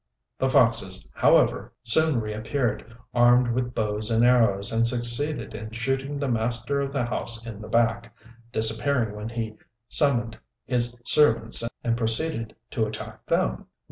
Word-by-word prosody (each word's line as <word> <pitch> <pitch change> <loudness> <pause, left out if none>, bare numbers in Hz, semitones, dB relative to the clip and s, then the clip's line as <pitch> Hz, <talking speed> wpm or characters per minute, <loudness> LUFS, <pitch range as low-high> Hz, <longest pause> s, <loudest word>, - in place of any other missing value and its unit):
The - - +1
foxes, - - +2
however, - - +2
soon 150 +3 +4
reappeared, 110 +1 -3 0.2
armed 120 0 +4
with 125 +1 -2
bows 105 0 -2
and 115 +1 +3
arrows, 110 -5 +3
and 115 +1 +2
succeeded 120 +5 0
in 110 0 -7
shooting 135 +5 -3
the 140 0 -2
master 120 +3 -1
of 140 0 -3
the 140 -4 -1
house 115 -1 -3
in 110 -3 -8
the 105 - -9
back, 115 0 0 0.4
disappearing 110 0 +1
when 105 +1 -6
he 115 -2 -5 0.3
summoned 120 -6 +2 0.3
his 120 -1 0
servants 115 -7 +4 0.2
and 115 -1 0
proceeded 115 +1 -2 0.2
to 110 -2 -1
attack 110 +1 -9
them. - - -1
115 Hz, 140 wpm, -25 LUFS, 110-125 Hz, 0.4 s, soon